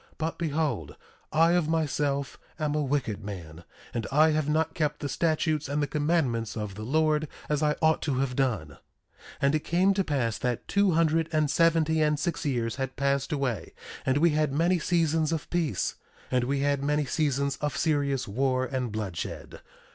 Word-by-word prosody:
But 160 +1 -3
behold, 150 - -1 0.4
I 165 +2 +4
of 175 -3 +2
myself 145 -3 -1 0.2
am 150 -2 -1
a 150 - +1
wicked 130 -7 -1
man, 85 -5 -8 0.3
and 115 -3 -2
I 155 +3 +5
have 155 -1 0
not 160 +1 +1
kept 150 -2 -1
the 145 - -3
statutes 155 0 0
and 145 +1 0
the 145 - +2
commandments 145 -8 0
of 105 -2 -4
the 105 - -8
Lord 155 +5 +1 0.2
as 150 0 0
I 150 -1 +2
ought 160 0 +4
to 140 -4 -1
have 130 -1 -1
done. 120 - 0
1:3 75 - -15 0.7
And 140 +1 +4
it 155 - +3
came 185 +4 +3
to 195 0 +1
pass 130 -9 -1
that 125 -1 -2
two 200 -2 +3
hundred 165 0 +2
and 155 -2 +1
seventy 160 -1 +3
and 150 -1 +2
six 165 +2 -2
years 120 -3 -1
had 135 -1 -3
passed 140 +1 0
away, 130 - -2 0.3
and 130 +1 +2
we 165 +2 +4
had 150 -1 +1
many 170 +5 +2
seasons 160 -2 +1
of 160 -2 -2
peace; 160 - -1 0.3
and 125 -1 +2
we 135 +2 0
had 140 -1 +1
many 150 +1 +1
seasons 140 -2 0
of 150 -1 -2
serious 140 -5 0
war 130 +4 0
and 130 -3 -3
bloodshed. 100 -6 -5
145 Hz, 185 wpm, -27 LUFS, 130-160 Hz, 0.7 s, I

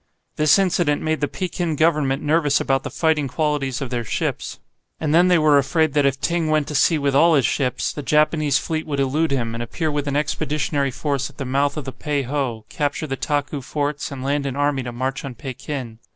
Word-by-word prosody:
This 150 -1 +5
incident 175 -6 +1
made 155 0 -1
the 145 - +2
Pekin 175 -1 -3
Government 150 -3 +2
nervous 150 -2 +2
about 135 0 +1
the - - -5
fighting 160 -3 +1
qualities 140 -2 -1
of 130 -2 -4
their 120 -1 -1
ships. 110 - -3 0.4
And 155 -1 0
then 175 +2 +6
they 180 -1 +5
were 155 -2 +5
afraid 150 +2 +1
that 145 -2 +3
if 135 0 -1
Ting 170 +2 0
went 155 -2 +1
to - - -4
sea 155 +3 +3
with 140 -2 0
all 165 +4 +5
his 135 -5 +3
ships, 130 -3 0
the 145 - -5
Japanese 150 -1 +2
fleet 160 -1 -3
would 140 -2 -2
elude 145 +4 +1
him, 120 -4 -1
and 115 - -4
appear 155 +7 -2
with 145 -1 -2
an 140 - -1
expeditionary 145 -1 0
force 140 +1 -2
at - - -20
the 135 - -4
mouth 140 +3 0
of 150 - -4
the 135 - -4
Pei 140 +2 -2
ho, 125 -4 -3
capture 145 +1 -2
the 135 -3 -3
Taku 145 +1 -2
forts, 145 +2 -3
and 135 -2 -6
land 140 +1 0
an 135 - -3
army 145 -1 +1
to 120 -1 -5
march 130 +3 -3
on 135 -3 -6
Pekin. 130 -2 -6
145 Hz, 225 wpm, -22 LUFS, 135-155 Hz, 0.4 s, then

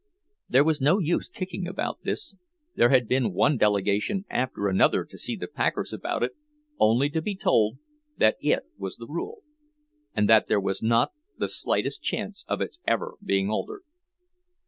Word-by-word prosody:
There 135 +3 +5
was 155 -2 +1
no 150 +8 +4
use 175 -3 0
kicking 185 -1 -5
about 185 - -3
this—there 345 - -2
had 125 -3 +4
been 125 -4 +1
one 145 +10 +3
delegation 105 - +1
after 125 -5 -1
another 95 -1 +3
to - - -15
see - - -2
the - - -5
packers - - -1
about - - -2
it, 125 - 0 0.5
only 115 +6 +4
to 160 - -1
be 200 +4 -3
told 110 - +2 0.4
that 110 - +4
it - - +2 0.2
was 95 -1 -4
the 115 - -10
rule, 420 - -6 0.7
and 105 -1 +3
that 110 0 +6
there 105 - +3
was 95 0 -2
not 115 - +3 0.3
the - - -1
slightest - - -1
chance - - -4
of - - -2
its 330 - -4
ever 485 0 0
being 100 - +1
altered. 410 - -3
130 Hz, 170 wpm, -26 LUFS, -, 0.7 s, that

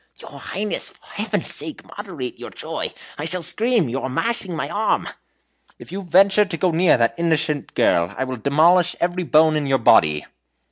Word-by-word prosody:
"Your - - -11
Highness, 210 +1 -1
for - - -19
Heaven's - - -2
sake, 315 - -5
moderate 175 -12 -7
your - - -8
joy. - - -5 0.3
I 150 - -3
shall 180 +1 -1
scream 225 - +1
you 125 +3 -3
are 130 - -3
mashing 195 - -2
my - - -3
arm!" 215 +1 -1 0.7
"If - - -13
you 195 +2 -5
venture 195 +3 +4
to 190 -4 -5
go 180 +2 +1
near 170 -1 +3
that 115 -1 +2
innocent 160 -3 -1
girl, 85 +3 +2
I - - -1
will 130 -1 -5
demolish 165 +7 +3
every 175 +1 -1
bone 155 -1 +4
in 150 -2 -1
your 135 -1 +2
body." 75 - +3
165 Hz, 185 wpm, -21 LUFS, 140-190 Hz, 0.7 s, venture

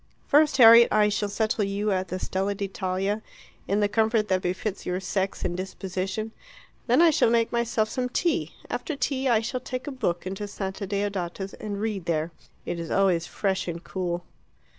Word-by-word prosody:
"First, 295 -1 +4
Harriet, 235 -1 +9
I 210 0 +4
shall 205 0 -1
settle 215 +1 0
you 200 +1 -1
at 185 -1 0
the 185 - -3
Stella 195 +2 -2
d'Italia, 195 +1 -2 0.5
in 200 +2 +1
the 205 - +4
comfort 220 +1 +1
that 185 -1 +2
befits 185 +3 -3
your 180 +1 -2
sex 190 0 -2
and 175 - -1
disposition. 190 +3 -4 0.6
Then 255 +7 +5
I 335 - +7
shall 280 - +3
make 230 -1 +2
myself 235 -2 +1
some 250 +3 -2
tea. 335 +6 0
After 310 - -3
tea 265 0 0
I 225 -2 +4
shall 250 +3 -3
take 255 0 -5
a 290 - -4
book 175 -11 -2
into 195 +2 -4
Santa 195 0 -5
Deodata's, 195 -1 -3
and 205 -2 -5
read 210 -5 -2
there. 165 0 -1 0.3
It 170 - -3
is 165 -1 -5
always 185 -4 +2
fresh 190 -2 -1
and 170 0 -5
cool." 175 -2 -3
200 Hz, 185 wpm, -26 LUFS, 185-225 Hz, 0.6 s, Harriet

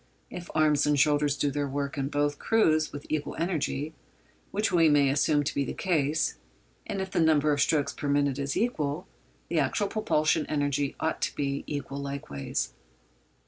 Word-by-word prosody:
If 180 0 -7
arms 155 -2 +3
and 145 -1 +3
shoulders 145 0 +3
do 145 - +1
their 145 0 -1
work 140 +1 -3
in 135 -2 -1
both 145 0 0
crews 155 -9 +2
with 145 0 -8
equal 155 -1 -2
energy—which 160 - -4
we 165 -3 +5
may 145 -2 +4
assume 145 +1 +2
to 145 - -2
be 140 - 0
the - - -5
case—and 160 +4 -2
if 190 0 -4
the - - 0
number 155 -2 +4
of 140 - 0
strokes 145 -3 +2
per 145 - -5
minute 140 -1 +1
is 140 0 -2
equal, 160 -9 -1 0.4
the - - 0
actual 205 -2 0
propulsive 160 -8 +1
energy 145 -2 0
ought 160 - -1
to - - -1
be 140 -1 -2
equal 140 -1 -4
likewise. 105 - -4
145 Hz, 170 wpm, -28 LUFS, 140-160 Hz, 0.4 s, we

